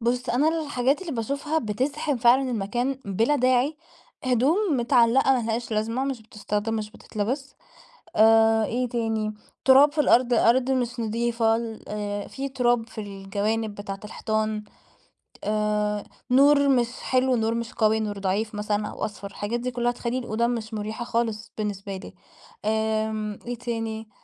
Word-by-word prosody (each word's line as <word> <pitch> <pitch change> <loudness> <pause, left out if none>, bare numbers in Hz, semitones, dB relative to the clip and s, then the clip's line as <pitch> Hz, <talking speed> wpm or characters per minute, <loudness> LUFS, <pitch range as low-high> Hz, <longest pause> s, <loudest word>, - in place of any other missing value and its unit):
بص 245 +2 -1
أنا 285 +6 +3 0.2
الحاجات 275 +1 +1
اللي 335 -5 -5
باشوفها 280 +7 -1
بتزحم 260 +5 -1
فعلًا 255 +3 +4
المكان، 240 +5 -1
بلا 225 +9 +1
داعي، 255 +3 +2 0.5
هدوم 255 - +3 0.2
متعلقة 245 +2 +4
ما 250 -3 +1
لهاش 235 +2 -2
لازمة، 225 +5 0
مش 265 -5 -3
بتستخدم، 210 +1 -3
مش 215 -1 -3
بتتلبس، 260 +9 -4 0.6
آآ، 225 0 +5
إيه 250 +1 -1
تاني، 225 -2 -1 0.3
تراب 275 +2 +7
في 310 - +2
الأرض، 245 -3 +4
الأرض 245 +3 +4
مش 245 -2 -1
نضيفة 230 0 +1
ال 225 -1 -5
آآ، 205 -1 -3
في 275 0 -5
تراب 240 -3 +1
في 220 - -6
الجوانب 205 +2 -2
بتاعة 200 -1 -6
الحيطان، 215 0 -2 0.8
آآ، 210 -1 0 0.3
نور 280 +2 +6
مش 245 -3 +3
حلو، 255 0 +2
نور 225 0 +1
مش 235 -1 -4
قوي، 220 0 +2
نور 205 -2 -3
ضعيف 205 +3 -1
مثلًا 210 0 -1
أو - - -4
أصفر، 205 -1 -7
الحاجات 205 +4 -3
دي 250 +1 -3
كلها 240 0 0
تخلي 240 +1 -3
الأوضة 235 -1 0
مش 225 -2 -3
مريحة 215 +3 -4
خالص، 230 -2 -2
بالنسبة 200 -2 -3
لي. 195 - -10 0.5
آمم 220 -1 -1
إيه 245 0 -3
تاني، 225 -2 -4
230 Hz, 150 wpm, -25 LUFS, 215-250 Hz, 0.8 s, تراب